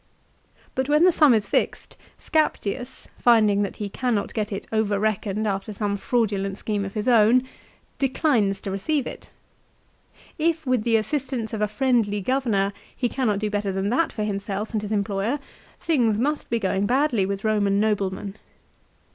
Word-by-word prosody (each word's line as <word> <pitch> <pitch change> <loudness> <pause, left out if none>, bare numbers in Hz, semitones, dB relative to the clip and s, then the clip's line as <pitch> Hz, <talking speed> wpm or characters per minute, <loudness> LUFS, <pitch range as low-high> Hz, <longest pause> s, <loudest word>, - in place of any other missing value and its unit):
But 260 +2 -2
when 300 +2 +4
the 365 - +7
sum 305 -4 +5
is 215 -2 +1
fixed - - -1 0.2
Scaptius, 260 -5 -1
finding 215 -4 +4
that 200 - -3
he 210 - -3
cannot 220 0 -1
get 215 -1 -2
it 195 - -4
over 215 -2 +1
reckoned 215 0 -1
after 195 +1 -3
some 205 0 -1
fraudulent 200 -3 -1
scheme 210 -2 -2
of 195 - -8
his 210 +3 -2
own, 235 +1 +5 0.6
declines 245 - +1
to 195 - -4
receive 270 +8 -1
it. - - -8 1.1
If 325 0 +1
with 255 -3 +2
the 230 -1 +4
assistance 245 0 -3
of 215 - -3
a 210 - +2
friendly 215 -2 +1
governor 205 -4 0 0.2
he 250 - 0
cannot 230 -7 0
do 210 +1 -2
hetter 205 -1 -1
than 190 +1 -1
that 320 +8 +1
for 215 - -3
himself 200 +1 -3
and 215 - 0
his 210 0 -6
employer, 205 +4 0 0.4
things 240 -10 +2
must 290 +6 -1
be 235 - +1
going 195 -1 0
badly 250 -6 +2
with 200 0 -3
Eoman 210 -2 +2
noblemen. 200 -1 -1
215 Hz, 165 wpm, -24 LUFS, 200-250 Hz, 1.1 s, the